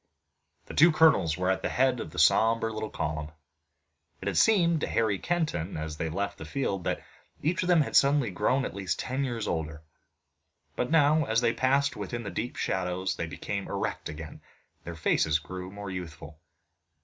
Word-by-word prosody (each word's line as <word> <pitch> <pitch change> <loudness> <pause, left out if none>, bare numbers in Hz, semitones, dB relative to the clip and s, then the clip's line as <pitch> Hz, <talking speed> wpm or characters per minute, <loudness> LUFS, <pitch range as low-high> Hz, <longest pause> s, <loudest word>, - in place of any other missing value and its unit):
The - - -9
two 170 +3 +6
colonels 140 - +4
were 90 +1 +1
at 95 - -1
the - - -1
head 130 0 +2
of - - -5
the - - -12
sombre 115 0 +3
little 110 0 -4
column. 75 0 -3 0.9
It - - -6
had - - -1
seemed 170 -7 +4
to - - -1
Harry 110 -4 +1
Kenton 150 - -2
as 80 0 -4
they 80 - -2
left 100 +4 -3
the - - -6
field 95 - -2
that - - -2 0.4
each 165 +4 +1
of 180 - -2
them 175 -3 +5
had 145 - -3
suddenly 140 -5 +4
grown 130 +8 +1
at - - -5
least 95 -2 -2
ten 130 +2 -2
years 120 -5 -3
older, 80 -1 -3 0.9
but 125 - -1
now 155 -1 +4
as 115 -1 +1
they 115 -1 +2
passed 140 +2 +2
within 120 -1 -5
the 100 - -5
deep 120 +3 -4
shadows 95 0 -1
they 85 - -3
became 100 +4 -5
erect - - -3
again 75 0 -7
and - - -32
their 85 - -6
faces 80 -1 +2
grew 90 +3 -7
more 100 -1 -7
youthful. 80 -4 -8
105 Hz, 190 wpm, -28 LUFS, 85-135 Hz, 0.9 s, two